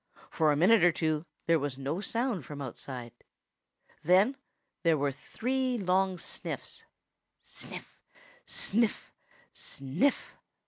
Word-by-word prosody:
For 155 -2 +3
a - - +3
minute 185 +6 +5
or 175 - +7
two 155 0 -1 0.2
there 165 -1 +4
was 140 -2 -3
no 140 +7 -2
sound 230 - -1
from 145 +1 -8
outside. 125 -2 -6 0.9
Then 190 - +5 0.5
there 165 -2 +4
were 140 0 +1
three 255 - -1
long 190 -1 +2
sniffs 170 - -5 0.6
sniff, - - -10 0.4
sniff, 225 +1 0 0.4
sniff! 140 - -1
170 Hz, 110 wpm, -30 LUFS, 145-215 Hz, 0.9 s, or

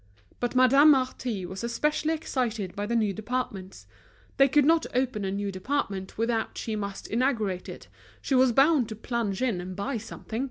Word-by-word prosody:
But 245 +1 -2
Madame 270 +4 +6
Marty 255 -7 +1
was 190 +4 -7
especially 300 +6 0
excited 235 - -3
by 205 +1 -3
the 235 - -1
new 215 -3 +1
departments; 210 -4 -5 0.5
they 275 - +6
could 285 +1 +3
not 325 +1 +3
open 250 -5 0
a 190 - -1
new 200 0 -2
department 195 -2 -3
without 225 0 -1
she 220 - -3
must 200 -2 -5
inaugurate 220 -7 -1
it, - - -9 0.3
she - - -3
was 260 -1 +5
bound 270 -1 +4
to 220 - -5
plunge 225 -2 -2
in 220 -9 0
and 185 +1 -7
buy 235 +6 -2
something. 225 +1 -7
235 Hz, 175 wpm, -27 LUFS, 200-260 Hz, 0.5 s, Madame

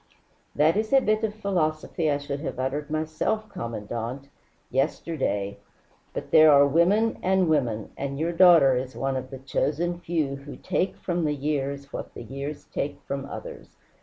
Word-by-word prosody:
"That 155 +6 +4
is 215 0 -1
a 270 - +8
bit 215 -3 +1
of 215 -1 -1
philosophy 165 -5 -1
I 145 - +2
should 145 0 -5
have 150 - -5
uttered 135 +4 -2
myself, 160 +8 -1
Commandante 115 +4 -5 0.4
yesterday. 135 -7 -1 0.5
But - - -6
there 155 0 +8
are 140 0 +7
women 180 +10 +3
and 190 -1 +2
women, 120 -9 0
and 140 0 -4
your 165 +3 0
daughter 165 -7 +7
is 130 +1 -3
one 135 0 -1
of 130 0 -4
the 135 - -7
chosen 155 +6 -1
few 155 -6 -1
who 140 +1 -10
take 190 - -1
from 175 -2 -2
the 150 -1 +1
years 140 -1 -3
what - - -6
the - - -7
years 140 +2 -6
take 145 - -2
from 140 0 -4
others. - - -9
145 Hz, 165 wpm, -26 LUFS, 135-170 Hz, 0.5 s, a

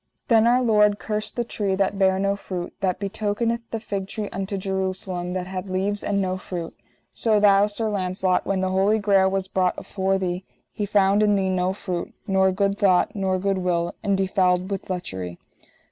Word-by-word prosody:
Then 225 -1 +5
Our 250 +2 +4
Lord 210 -3 +4
cursed 215 0 -4
the 240 - 0
tree 205 -4 -2
that 195 +1 0
bare 190 -1 +4
no 200 +1 +1
fruit; 180 -3 -6
that 185 -2 +1
betokeneth 215 +3 -1
the 225 - -3
fig 200 -3 -4
tree 210 0 -5
unto 195 +1 -3
Jerusalem, 185 -2 -3
that 185 -1 -2
had 185 +1 -5
leaves 195 +2 -1
and 200 -1 0
no 185 -1 -1
fruit. 175 -3 -6 0.4
So 220 -2 +2
thou, 200 0 +5
Sir 220 +2 -3
Launcelot, 185 -2 0
when 195 -1 -1
the 185 0 0
Holy 195 +3 +3
Grail 200 -2 +3
was 190 0 -2
brought 185 -1 0
afore 195 -1 -1
thee, 180 -1 -2 0.3
He 205 - -3
found 200 0 +3
in 210 -1 +4
thee 190 -1 +1
no 185 0 +1
fruit, 180 -3 -5
nor 190 -2 +3
good 200 +1 0
thought 185 -3 +3
nor 190 -2 0
good 195 0 0
will, 175 -2 0
and 200 -2 +1
defouled 185 -1 +1
with 195 - -4
lechery. 95 - -4
195 Hz, 190 wpm, -24 LUFS, 185-205 Hz, 0.4 s, Then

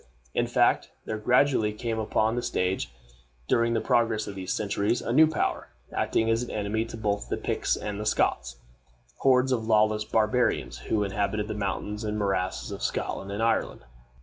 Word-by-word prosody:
In - - +1
fact, - - +2 0.2
there 110 -1 -3
gradually 125 -1 +3
came 115 +1 -3
upon 110 +1 +1
the 120 - -1
stage, 90 - -1 0.6
during 115 0 +2
the - - +2
progress 115 -2 +1
of 100 - -6
these 95 -1 -5
centuries, 105 +2 0
a 115 - -3
new 155 +4 +7
power, 160 - -1 0.3
acting 110 - +1
as 115 +1 +2
an 125 - -5
enemy 105 +2 -1
to 115 - -8
both 105 -2 -2
the - - -1
Picts - - 0
and 105 0 -4
Scots; - - +1 0.6
hordes 130 -1 +3
of 115 -3 0
lawless 110 -1 +3
barbarians, 110 +3 +1
who 105 -2 0
inhabited 105 +1 -1
the 110 - -3
mountains 105 +1 -3
and 105 0 -2
morasses 95 -3 -1
of - - -6
Scotland 95 +1 -3
and 105 +3 -2
Ireland. 115 - 0
110 Hz, 175 wpm, -27 LUFS, 105-115 Hz, 0.6 s, new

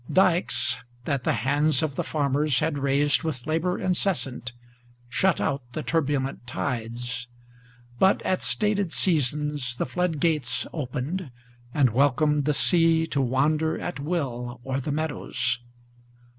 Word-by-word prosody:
Dikes, 185 -7 +3 0.3
that 135 -3 -1
the - - +2
hands 150 +3 +3
of 155 -3 -1
the - - -2
farmers 145 -2 +1
had 150 -2 0
raised 140 +1 +2
with 150 -7 -4
labor 165 +4 0
incessant, 170 - -1 0.6
Shut 170 +10 +2
out 140 0 0
the 155 - -3
turbulent 140 -5 -1
tides; 125 0 -3 0.7
but 190 +1 +4
at 185 - 0
stated 205 -4 0
seasons 150 -5 +1
the - - -1
flood 170 +2 -1
gates 140 -7 +1
Opened, 145 +4 -3 0.4
and 130 -2 +3
welcomed 145 +3 +2
the 150 - +2
sea 165 -1 +4
to 140 -3 -1
wander 150 +5 +1
at 175 - -5
will 130 -6 -3
o'er 135 0 -1
the 140 +2 -3
meadows. 145 -5 -1
145 Hz, 130 wpm, -26 LUFS, 130-160 Hz, 0.7 s, but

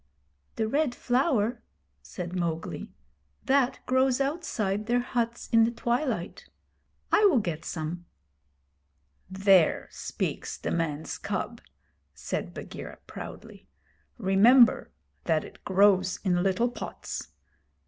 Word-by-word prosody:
'The 220 - 0
Red 280 +1 +1
Flower?' 245 -3 +1 0.4
said 175 - -6
Mowgli. 170 -2 -3 0.6
'That 270 -2 +2
grows 260 0 +2
outside 230 - -1
their 245 +1 +2
huts 235 -1 -2
in 230 -1 +6
the 225 - +3
twilight. 235 - -2 0.6
I 425 - +5
will 360 -10 +5
get 170 -8 -2
some.' 170 +2 -5 1.2
'There 190 -3 +3
speaks - - -4
the - - -4
man's 160 -2 -2
cub,' 205 +4 -4 0.5
said - - -4
Bagheera, - - -8
proudly. - - -10 0.5
'Remember 230 +4 +5 0.4
that - - +2
it - - -13
grows 190 -1 +3
in 180 -3 +2
little 195 +6 +2
pots. - - -6
220 Hz, 105 wpm, -28 LUFS, 185-245 Hz, 1.2 s, in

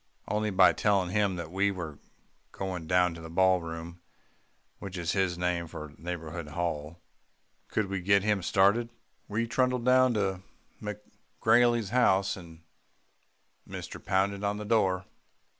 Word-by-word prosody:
Only 105 0 0
by 95 -2 +6
telling 100 -4 +1
him 100 -2 +1
that 85 -2 -6
we 100 +2 +2
were 85 -7 -6 0.5
going 90 -4 -5
down 90 0 +3
to 85 - -10
the 80 - -8
ballroom, 85 -1 0 0.8
which 95 -1 -7
is 85 0 -1
his 95 -3 0
name 90 -1 -1
for 75 -2 -8
Neighbourhood 85 -1 -6
Hall, 80 0 -3 0.7
could 110 - 0
we 95 -1 -3
get 100 +1 +3
him 105 -2 +1
started. 100 +6 +3 0.4
We 110 +3 -1
trundled 125 +1 0
down 130 -1 +5
to 95 -3 -1 0.4
McGrailey's 110 +2 0
house, 100 -6 +3
and 85 -3 -13 1.0
mister - - -8
pounded 100 +1 0
on 100 0 0
the 105 - -6
door." 95 -4 +2
95 Hz, 140 wpm, -29 LUFS, 85-105 Hz, 1.0 s, by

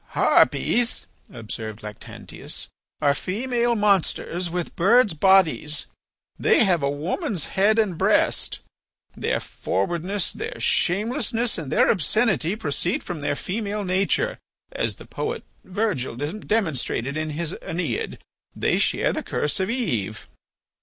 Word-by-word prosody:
"Harpies," 240 -1 +3 0.3
observed 110 -2 -6
Lactantius, 105 -1 -7 0.3
"are 145 -2 +4
female 235 - 0
Monsters 190 -3 +1
with 175 0 -3
birds' 215 +2 +5
bodies. 160 -3 +3 0.5
They - - +5
have 180 -6 +3
a 140 - +1
woman's 175 - -2
head 205 +3 +4
and 200 -7 +1
breast. - - +2 0.5
Their - - 0
forwardness, 175 - -2
their 455 +3 -5
shamelessness, 225 +4 0
and 150 -5 -6
their 250 +3 +5
obscenity 195 - +1
proceed 175 -2 -1
from 175 -5 -5
their 145 - 0
female 205 +4 -3
nature 195 - +1 0.3
as - - -1
the - - -13
poet - - -4 0.2
Virgil 185 - -1
demonstrated 150 - -1
in 155 0 -2
his 170 0 -1
'Æneid.' 165 - -2 0.4
They - - +1
share - - +2
the - - -2
curse 150 +7 -1
of 190 +1 0
Eve." 120 - -2
185 Hz, 120 wpm, -24 LUFS, 150-215 Hz, 0.5 s, birds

